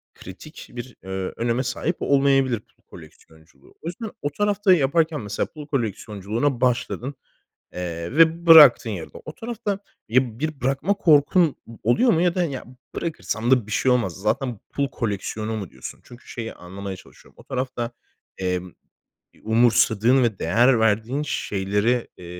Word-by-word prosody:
kritik 95 Hz, -, -11 dB
bir, 120 Hz, +1 st, -8 dB
eee, 95 Hz, -, -11 dB, 0.3 s
öneme 120 Hz, +2 st, 0 dB
sahip 140 Hz, +7 st, -2 dB
olmayabilir 135 Hz, -4 st, +3 dB
pul -, -, -32 dB
koleksiyonculuğu. 80 Hz, -3 st, -17 dB
O 165 Hz, -, -8 dB
yüzden 210 Hz, +5 st, -5 dB
o 145 Hz, -, -1 dB
tarafta 205 Hz, +2 st, +2 dB
yaparken 155 Hz, -1 st, +1 dB
mesela 105 Hz, 0 st, -2 dB
pul 150 Hz, -1 st, -11 dB
koleksiyonculuğuna 115 Hz, 0 st, -2 dB
başladın, 125 Hz, +2 st, -1 dB, 0.6 s
eee, 85 Hz, +1 st, -5 dB
ve 165 Hz, +1 st, +4 dB
bıraktın 150 Hz, -8 st, +9 dB
yarıda. 85 Hz, -6 st, -7 dB
O 155 Hz, -, -8 dB
tarafta 220 Hz, -4 st, -4 dB, 0.3 s
ya 120 Hz, -1 st, +1 dB
bir 155 Hz, 0 st, -3 dB
bırakma 135 Hz, +10 st, 0 dB
korkun 160 Hz, -2 st, +4 dB
o 115 Hz, -1 st, -12 dB
oluyor 245 Hz, -, +4 dB
mu 165 Hz, -, +2 dB
ya 175 Hz, -1 st, +2 dB
da 180 Hz, -, +1 dB
ya 140 Hz, -6 st, -5 dB, 0.3 s
bırakırsam 120 Hz, -8 st, -3 dB
da 125 Hz, -5 st, +3 dB
bir 110 Hz, -, -7 dB
şey 130 Hz, -, +2 dB
olmaz. 115 Hz, -8 st, +1 dB
Zaten 115 Hz, +3 st, -1 dB
pul 140 Hz, -1 st, -1 dB
koleksiyonu 110 Hz, -1 st, -3 dB
mu 100 Hz, -5 st, -6 dB
diyorsun? 65 Hz, -1 st, -9 dB
Çünkü 120 Hz, 0 st, -15 dB
şeyi 115 Hz, -2 st, -6 dB
anlamaya 95 Hz, +2 st, -7 dB
çalışıyorum. 95 Hz, -, -18 dB
O -, -, -15 dB
tarafta, 125 Hz, -2 st, -3 dB, 0.5 s
emm, 90 Hz, -1 st, -2 dB, 0.6 s
eee, -, -, -24 dB
umursadığın 115 Hz, +2 st, +3 dB
ve 110 Hz, -5 st, 0 dB
değer 120 Hz, +9 st, +3 dB
verdiğin 110 Hz, +6 st, +1 dB
şeyleri, 105 Hz, +1 st, -1 dB
eee, 90 Hz, -, -11 dB
125 Hz, 155 wpm, -23 LUFS, 105-150 Hz, 0.6 s, bıraktın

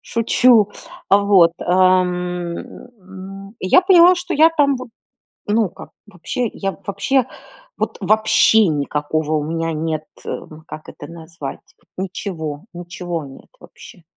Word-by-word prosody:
шучу. 230 Hz, -1 st, +3 dB, 0.4 s
А 200 Hz, -, +5 dB
вот, 195 Hz, -5 st, +4 dB
ам, 185 Hz, 0 st, +3 dB, 0.4 s
м, 195 Hz, -3 st, -11 dB
я 185 Hz, -, +4 dB
поняла, 365 Hz, -1 st, +6 dB
что 355 Hz, 0 st, -5 dB
я 315 Hz, +3 st, +6 dB
там 280 Hz, -2 st, +3 dB
вот, 255 Hz, -1 st, -9 dB, 0.6 s
ну, 215 Hz, 0 st, +1 dB
как -, -, -13 dB, 0.2 s
вообще, 210 Hz, +5 st, -4 dB
я 195 Hz, -1 st, -3 dB
вообще, 240 Hz, +7 st, 0 dB, 0.5 s
вот -, -, -3 dB
вообще 215 Hz, +1 st, +4 dB
никакого 150 Hz, +1 st, -2 dB
у 150 Hz, -, 0 dB
меня 165 Hz, +1 st, -2 dB
нет, 155 Hz, 0 st, -3 dB, 0.2 s
э, -, -, -4 dB, 0.3 s
как 155 Hz, -, -10 dB
это 145 Hz, -, -10 dB
назвать, 165 Hz, -3 st, -9 dB, 0.4 s
ничего 175 Hz, -5 st, -5 dB
ничего 175 Hz, -2 st, -6 dB
нет 135 Hz, -1 st, -14 dB
вообще. 175 Hz, -, -15 dB
185 Hz, 125 wpm, -19 LUFS, 165-220 Hz, 0.6 s, поняла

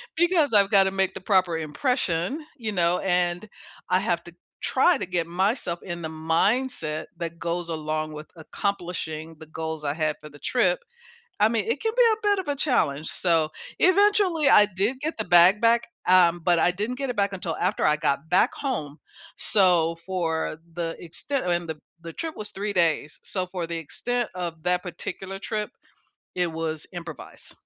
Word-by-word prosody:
because 335 Hz, -6 st, +3 dB
I've 200 Hz, -1 st, +5 dB
gotta 195 Hz, -1 st, +5 dB
make 195 Hz, -1 st, 0 dB
the -, -, -8 dB
proper 185 Hz, -4 st, +2 dB
impression, 185 Hz, -, -1 dB
you 220 Hz, -3 st, -3 dB
know, 175 Hz, -2 st, +2 dB
and 180 Hz, +1 st, 0 dB, 0.4 s
I -, -, +4 dB
have -, -, -1 dB
to -, -, -10 dB
g -, -, -29 dB, 0.2 s
try 350 Hz, -5 st, +3 dB
to -, -, -3 dB
get 175 Hz, -2 st, -1 dB
myself 185 Hz, 0 st, 0 dB
in 175 Hz, -2 st, -5 dB
the 160 Hz, -, -4 dB
mindset 160 Hz, +1 st, 0 dB
that 170 Hz, -1 st, -5 dB
goes 170 Hz, 0 st, -2 dB
along 155 Hz, -1 st, -3 dB
with 150 Hz, +1 st, -8 dB
accomplishing 165 Hz, -3 st, -4 dB
the 160 Hz, -, -10 dB
goals 160 Hz, -1 st, -5 dB
I 145 Hz, 0 st, 0 dB
had 155 Hz, -2 st, 0 dB
for 150 Hz, -, -10 dB
the 145 Hz, 0 st, -15 dB
trip. 185 Hz, -8 st, +1 dB, 0.6 s
I 210 Hz, -, +6 dB
mean, 225 Hz, -3 st, 0 dB
it 235 Hz, +5 st, -1 dB
can 445 Hz, 0 st, 0 dB
be -, -, +6 dB
a 430 Hz, -1 st, -3 dB
bit 405 Hz, -1 st, +3 dB
of 370 Hz, -, -5 dB
a 285 Hz, -, 0 dB
challenge, 160 Hz, -, +1 dB
so, 165 Hz, -3 st, +1 dB, 0.3 s
eventually, 375 Hz, -6 st, +4 dB
I 210 Hz, -, +8 dB
did 210 Hz, +7 st, -1 dB
get 315 Hz, -2 st, -3 dB
the 220 Hz, -, -2 dB
bag 180 Hz, +4 st, +6 dB
back, 230 Hz, 0 st, +4 dB, 0.3 s
um, 175 Hz, -2 st, +5 dB
but 175 Hz, -2 st, +3 dB
I 175 Hz, -, +4 dB
didn't 210 Hz, +7 st, -3 dB
get 275 Hz, -1 st, -3 dB
it 245 Hz, -, -2 dB
back 200 Hz, -1 st, +1 dB
until 175 Hz, -4 st, -3 dB
after 185 Hz, +4 st, 0 dB
I 150 Hz, 0 st, +3 dB
got 145 Hz, 0 st, -1 dB
back 190 Hz, +7 st, +3 dB
home, 155 Hz, -, -3 dB, 0.4 s
so, 175 Hz, -5 st, +4 dB
for 165 Hz, -4 st, -2 dB, 0.2 s
the 165 Hz, -1 st, -3 dB
extent 180 Hz, -, -2 dB
and 175 Hz, -2 st, 0 dB
the 155 Hz, -, -4 dB, 0.2 s
the 165 Hz, -1 st, -8 dB
trip 325 Hz, -1 st, -5 dB
was 210 Hz, -1 st, -5 dB
3 205 Hz, +1 st, -3 dB
days, 165 Hz, -4 st, +1 dB
so, 185 Hz, -2 st, -2 dB
for 180 Hz, -2 st, -4 dB
the 170 Hz, -1 st, -3 dB
extent 240 Hz, +9 st, -2 dB
of 170 Hz, -3 st, -5 dB
that 180 Hz, +1 st, +1 dB
particular 190 Hz, +2 st, -6 dB
trip, 215 Hz, +3 st, -3 dB, 0.6 s
it 180 Hz, -2 st, 0 dB
was 160 Hz, -1 st, -3 dB
improvise. 165 Hz, -6 st, -8 dB
180 Hz, 185 wpm, -25 LUFS, 165-215 Hz, 0.6 s, I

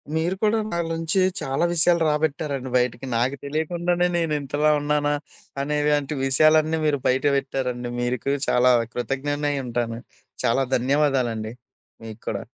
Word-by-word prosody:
మీరు 165 Hz, +4 st, 0 dB
కూడా 215 Hz, +1 st, +3 dB
నా 170 Hz, -, -1 dB
నుంచి 165 Hz, +4 st, 0 dB, 0.2 s
చాలా 135 Hz, +3 st, 0 dB
విషయాలు 170 Hz, 0 st, +3 dB
రాబెట్టారండి, 150 Hz, -3 st, -1 dB
బయటికి 125 Hz, +1 st, -1 dB
నాకు 125 Hz, +4 st, +1 dB
తెలియకుండానే 175 Hz, +4 st, 0 dB
నేను 165 Hz, -2 st, 0 dB
ఇంతలా 145 Hz, +2 st, +1 dB
ఉన్నానా 145 Hz, 0 st, +1 dB, 0.5 s
అనే 150 Hz, +2 st, -1 dB
వంటి 145 Hz, 0 st, 0 dB
విషయాలన్నీ 155 Hz, +3 st, +4 dB
మీరు 145 Hz, -2 st, +1 dB
బయట 130 Hz, +1 st, +1 dB
పెట్టారండి. 125 Hz, -3 st, -3 dB
మీరుకు 125 Hz, +3 st, -1 dB
చాలా 125 Hz, +1 st, +4 dB, 0.2 s
కృతజ్ఞుడునై 145 Hz, +3 st, -2 dB
ఉంటాను. 115 Hz, -1 st, -2 dB, 0.5 s
చాలా 135 Hz, +4 st, +2 dB
ధన్యవాదాలండి 125 Hz, -4 st, 0 dB, 0.5 s
మీకు 110 Hz, 0 st, -9 dB
కూడా. -, -, -3 dB
145 Hz, 130 wpm, -23 LUFS, 125-155 Hz, 0.5 s, విషయాలన్నీ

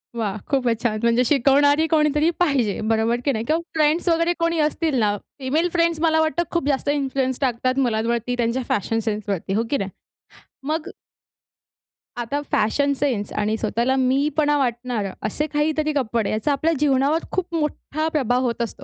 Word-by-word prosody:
वाह! 215 Hz, -4 st, -2 dB
खूपचं 250 Hz, -5 st, +1 dB
छान. 215 Hz, -3 st, 0 dB
म्हणजे 235 Hz, +2 st, +3 dB
शिकवणारी 285 Hz, +3 st, +4 dB
कोणीतरी 300 Hz, +1 st, +3 dB
पाहिजे 275 Hz, -, +1 dB
बरोबर 225 Hz, +2 st, +1 dB
की 280 Hz, -, +3 dB
नाही? 225 Hz, -2 st, -3 dB
किंवा 320 Hz, +6 st, +1 dB
फ्रेंड्स 315 Hz, +3 st, +2 dB
वगैरे 335 Hz, +1 st, +2 dB
कोणी 335 Hz, -1 st, +1 dB
असतील 310 Hz, -1 st, -2 dB
ना, 205 Hz, -2 st, +2 dB, 0.2 s
फिमेल 300 Hz, +6 st, 0 dB
फ्रेंड 335 Hz, -1 st, +2 dB
मला 320 Hz, -1 st, +3 dB
वाटतं 315 Hz, +2 st, +1 dB
खूप 340 Hz, -5 st, -1 dB
जास्त 280 Hz, 0 st, 0 dB
इन्फ्लुअन्स 270 Hz, -3 st, -1 dB
टाकतात 255 Hz, +1 st, 0 dB
मुलांवरती 235 Hz, +2 st, -1 dB
त्यांच्या 240 Hz, +2 st, 0 dB
फॅशन 225 Hz, +3 st, 0 dB
सेन्सवरती, 200 Hz, -3 st, -3 dB
हो 225 Hz, -, +1 dB
की 280 Hz, -, +1 dB
नाही? 195 Hz, -4 st, -3 dB, 0.8 s
मग 315 Hz, 0 st, -2 dB, 1.3 s
आता 280 Hz, +5 st, -2 dB
फॅशन 280 Hz, +6 st, +2 dB
सेन्स 255 Hz, -8 st, -1 dB
आणि 210 Hz, +1 st, 0 dB
स्वतःला 235 Hz, +4 st, 0 dB
मी 265 Hz, +3 st, +2 dB
पणा 295 Hz, -1 st, +3 dB
वाटणारं, 240 Hz, -6 st, -2 dB
असे 300 Hz, +8 st, -2 dB
काहीतरी 305 Hz, 0 st, 0 dB
कपडे 235 Hz, -6 st, 0 dB
याचा 215 Hz, +7 st, 0 dB
आपल्या 315 Hz, +4 st, +1 dB
जीवनावर 285 Hz, +2 st, +2 dB
खूप 360 Hz, -2 st, -2 dB
मोठा 310 Hz, 0 st, -2 dB
प्रभाव 250 Hz, -4 st, +1 dB
होत 235 Hz, 0 st, -2 dB
असतो. 235 Hz, -, -5 dB
270 Hz, 165 wpm, -22 LUFS, 230-305 Hz, 1.3 s, शिकवणारी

